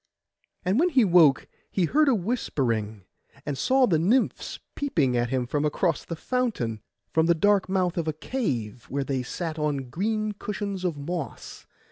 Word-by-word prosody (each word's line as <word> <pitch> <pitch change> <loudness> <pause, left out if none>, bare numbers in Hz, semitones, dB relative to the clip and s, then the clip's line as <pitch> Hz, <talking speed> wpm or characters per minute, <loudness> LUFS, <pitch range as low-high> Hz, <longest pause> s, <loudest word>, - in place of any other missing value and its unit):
And 190 +7 +2
when 355 +3 +4
he 265 -8 +4
woke 170 -7 +5 0.2
he 185 - +1
heard 295 - +3
a 260 - +4
whispering, 120 - -1 0.4
and 145 - -2
saw 260 - +3
the 165 -9 +2
nymphs 225 +10 +1 0.2
peeping 155 - 0
at 120 0 +1
him 130 -1 -1 0.2
across 155 +2 0
the 165 - -5
fountain 185 - -2 0.3
from 160 0 +3
the 170 - +4
dark 200 +2 +3
mouth 180 -2 +1
of 165 - -2
a 155 - 0
cave, 125 - -3
where 140 +1 -1
they 135 -1 -1
sat 160 +5 -4
on 140 -4 -2
green 215 - -1
cushions 200 -2 -4
of 175 -5 -1
moss. 160 +1 -6
170 Hz, 165 wpm, -26 LUFS, 135-210 Hz, 0.4 s, woke